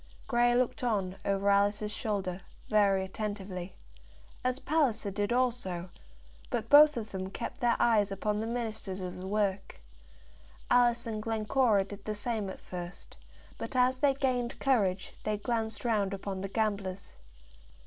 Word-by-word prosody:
Grey 240 0 +3
looked 250 +2 0
on, 195 -6 0
over 195 0 0
Alice's 205 +1 +2
shoulder, 195 -4 -2 0.3
very 200 -2 +4
attentively, 190 -3 -5 0.7
as 255 0 +1
did 265 - -15
Palliser 220 -9 +1
also, 210 -9 -1 0.6
but 230 -1 -3
both 295 0 +8
of 220 -2 -5
them 190 -1 -4
kept 235 +7 -6
their 240 -1 +3
eyes 210 -4 +3
upon 210 +2 -1
the 220 - -2
ministers 220 -5 -4
of 180 -1 -5
the 185 +1 -6
work. 200 -1 -1 0.9
Alice 240 -1 +4
and 220 -2 -3
Glencora 220 -1 +2
did 200 +1 -10
the 215 - -2
same 210 -1 -2
at - - -8
first, 180 0 -8 0.4
but - - -6
as 255 +1 +3
they 280 -1 +3
gained 250 -3 -1
courage 200 -9 +1
they 215 0 0
glanced 220 +1 -2
round 205 -4 +1
upon 195 -1 -5
the 195 - -4
gamblers. 200 -3 -2
210 Hz, 150 wpm, -30 LUFS, 195-240 Hz, 0.9 s, both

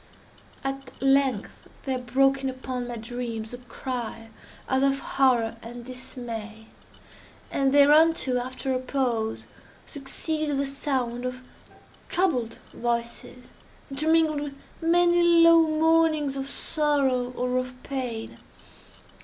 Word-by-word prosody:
At 270 -1 -5
length 270 -4 +1
there 260 -2 -1
broke 270 +2 +2
in 265 - 0
upon 255 -1 -5
my 240 - -5
dreams 230 -1 -5
a 245 - -7
cry 240 -2 -6 0.4
as 265 0 +1
of 275 0 +3
horror 245 -5 +1
and 240 +1 -9
dismay; 230 -4 -7 0.9
and 275 -1 +2
thereunto, 290 -2 +5
after 260 +2 -3
a 255 - 0
pause, 245 -4 -1 0.4
succeeded 295 +1 -2
the 280 - 0
sound 265 -3 -2
of 255 0 -5 0.7
troubled 275 -11 0 0.2
voices, 235 +1 -3 0.4
intermingled 310 +1 +2
with 290 -1 -5 0.3
many 345 +1 +4 0.2
low 335 -1 +7
moanings 315 -2 +2
of 270 0 -4
sorrow 275 -6 0
or 250 0 0
of 255 0 -5
pain. 245 -5 -5
260 Hz, 110 wpm, -26 LUFS, 245-285 Hz, 0.9 s, low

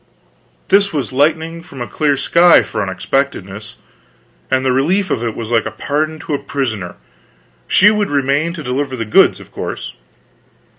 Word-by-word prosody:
This 200 +1 +4
was 145 -4 -3
lightning 160 +4 0
from 140 -5 -12
a 120 - -3
clear 145 +2 0
sky, 170 +5 +5
for - - -4
unexpectedness; 100 0 -3 0.7
and 130 0 +1
the 130 - +3
relief 175 +10 +1
of 115 - -1
it 115 -2 -3
was 115 0 -6
like 115 -2 +2
pardon 155 +2 -1
to 155 - -5
a 140 - 0
prisoner. 120 -10 -4 0.7
She 210 +3 +5
would 210 -1 0
remain 140 +3 +1
to 160 -3 -7
deliver 130 +1 -2
the 115 -2 -4
goods, 110 - +4
of - - -15
course. - - -6
140 Hz, 160 wpm, -16 LUFS, 120-160 Hz, 0.7 s, sky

